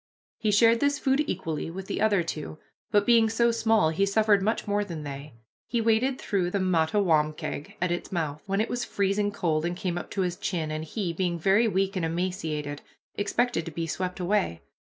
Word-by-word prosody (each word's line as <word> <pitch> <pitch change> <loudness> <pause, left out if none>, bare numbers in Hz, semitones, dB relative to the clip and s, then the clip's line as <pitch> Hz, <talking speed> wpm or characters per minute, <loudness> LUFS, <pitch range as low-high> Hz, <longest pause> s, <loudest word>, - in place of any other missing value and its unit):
He 220 -2 0
shared 230 +3 +5
this 285 +1 +2
food 270 +2 +2
equally 160 -1 -3
with 185 +3 -7
the - - -3
other 205 -5 +3
two, 155 -1 -5 0.3
but 205 0 +3
being 230 -1 +5
so 235 +1 +3
small 225 -7 +3
he 165 +5 0
suffered 205 0 +3
much 220 +2 -1
more 205 0 +1
than 170 -6 -6
they. 140 -2 -7 0.3
He 235 - 0
waded 230 +4 +2
through 190 -4 0
the 200 - -1
Mattawamkeag 160 -4 +1
at 180 0 0
its 175 - -3
mouth, 155 -4 -2
when 195 +1 0
it 220 - 0
was 245 0 -2
freezing 200 +1 0
cold 160 -6 0
and 175 +1 -2
came 180 -3 -2
up - - -9
to 195 - -2
his 180 -1 -1
chin, 160 -4 -2
and 155 0 -3
he, 175 +1 -3
being 175 0 -1
very 195 +7 +3
weak 195 -1 0
and 185 - -1
emaciated, 160 -4 -2 0.3
expected 205 -1 0
to 165 - -6
be 165 +2 -3
swept 180 +3 -3
away. 180 - 0
190 Hz, 200 wpm, -27 LUFS, 165-215 Hz, 0.3 s, shared